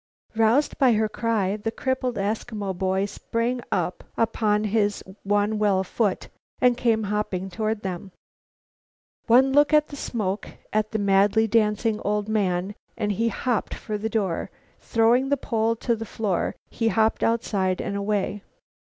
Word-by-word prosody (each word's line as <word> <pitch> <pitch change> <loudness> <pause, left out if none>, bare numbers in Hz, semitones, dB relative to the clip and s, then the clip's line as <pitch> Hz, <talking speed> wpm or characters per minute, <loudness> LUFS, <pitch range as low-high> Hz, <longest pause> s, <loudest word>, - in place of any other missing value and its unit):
Roused 225 +6 +2
by 255 -3 +5
her 220 0 +2
cry, 210 -3 -1
the 220 +1 -3
crippled 255 +1 -2
Eskimo 205 -1 -3
boy 190 +1 0
sprang 230 +4 -2
upon 215 -2 0
his 205 -1 0 0.2
one 205 +1 +1
well 200 -3 +2
foot 200 +1 -1 0.3
and 250 -1 +4
came 230 -3 +1
hopping 200 -2 -2
toward 215 +2 -2
them. 190 0 -5 1.2
One 260 +3 +5
look 290 +2 +4
at 300 0 +3
the 285 - -8
smoke, 210 -7 -3 0.2
at 215 0 +1
the 220 - -2
madly 200 +2 +3
dancing 215 0 +1
old 210 0 -1
man, 195 -3 0 0.2
and 210 -2 0
he 225 +4 0
hopped 235 -2 -1
for 215 - -5
the 215 +2 -2
door. 195 -7 -1 0.3
Throwing 235 +4 +2
the 285 - +2
pole 225 -2 0
to 235 +1 0
the 225 - -6
floor, 210 -5 -2 0.2
he 230 - -1
hopped 220 0 +2
outside 200 -5 0
and 200 - -3
away. 200 0 -1
215 Hz, 150 wpm, -24 LUFS, 200-230 Hz, 1.2 s, by